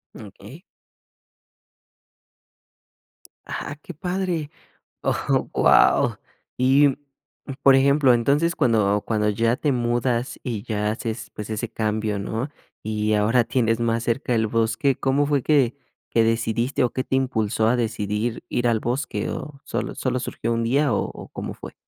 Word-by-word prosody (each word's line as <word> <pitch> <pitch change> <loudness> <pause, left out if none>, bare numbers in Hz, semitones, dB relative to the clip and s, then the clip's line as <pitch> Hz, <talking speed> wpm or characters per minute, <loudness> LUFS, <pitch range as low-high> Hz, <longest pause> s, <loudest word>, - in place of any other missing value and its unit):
Okey. - - -12 2.8
¡Ah, 145 - -5
qué 180 - -9
padre!, 180 -3 -2 0.5
oh, - - 0
guau. - - +4 0.4
Y, 135 +3 +5
mm, 135 - -1 0.7
por 135 -1 +7
ejemplo, 135 -1 +5
entonces 145 +8 +1
cuando 105 -6 +2
cuando 105 -2 0
ya 115 +3 +1
te 145 -3 0
mudas 120 0 -1
y 115 -5 -4
ya 105 -3 -1
haces, 110 +1 -5
pues, 105 0 -7
ese 110 +1 -3
cambio, 110 -1 -1
¿no?, 110 +7 -3 0.4
y 110 0 -1
ahora 110 +4 +3
tienes 115 -2 +1
más 115 -1 0
cerca 120 +1 0
el 110 -1 +2
bosque, 115 +5 +1
¿cómo 135 +2 +1
fue 145 -3 +1
qué 140 -5 +2 0.3
qué 115 -1 +3
decidiste 115 +3 0
o 120 - +1
qué 130 - -3
te 130 - 0
impulsó 110 -4 +1
a 125 - +3
decidir 110 0 -2
ir 120 0 -1
al 110 -2 +1
bosque? 130 +6 -2
¿O 140 -2 -7
solo - - -3
solo 125 -1 -1
surgió 115 -1 -3
un 115 0 0
día 140 +2 +2
o - - +1
o - - -10
cómo - - -6
fue? - - -10
120 Hz, 150 wpm, -23 LUFS, 110-135 Hz, 2.8 s, por